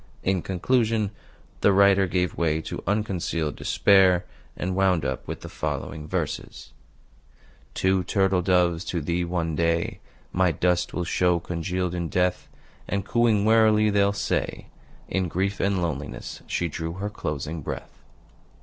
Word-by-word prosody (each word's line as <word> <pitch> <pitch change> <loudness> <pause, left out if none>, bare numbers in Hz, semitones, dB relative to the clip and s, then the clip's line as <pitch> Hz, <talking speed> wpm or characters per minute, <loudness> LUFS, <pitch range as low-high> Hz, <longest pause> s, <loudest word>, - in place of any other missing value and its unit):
In 95 -1 +1
conclusion, 110 +2 +1 0.5
the 100 - +4
writer 100 0 +5
gave 90 0 0
way 80 -2 +1
to - - -6
unconcealed 90 -7 -1
despair, 95 -3 +4 0.3
and 90 +1 -2
wound 95 -5 +2
up - - -3
with - - -5
the - - -7
following 75 -2 -4
verses: - - -4 1.0
"Two 95 0 +2
turtle 95 0 +2
doves 90 -2 +2
to 85 - -2
thee, 85 +3 -1
one 85 -2 -2
day, 85 +1 0 0.3
My 90 -1 +3
dust 90 +3 +1
will 90 - -2
show, 90 0 +2
congealed 90 +1 -2
in 85 -2 -3
death; 90 0 0 0.4
And, 100 0 -2
cooing 110 -3 +2
wearily, 110 -1 +5
they'll 100 0 +3
say: 100 - -2 0.4
'In 95 -1 -1
grief 95 +4 -1
and 95 -2 +1
loneliness 75 -4 -5
she 90 - -1
drew 80 +1 -4
her 100 +3 -4
closing 75 -3 -4
breath. - - -7
90 Hz, 140 wpm, -25 LUFS, 85-100 Hz, 1.0 s, writer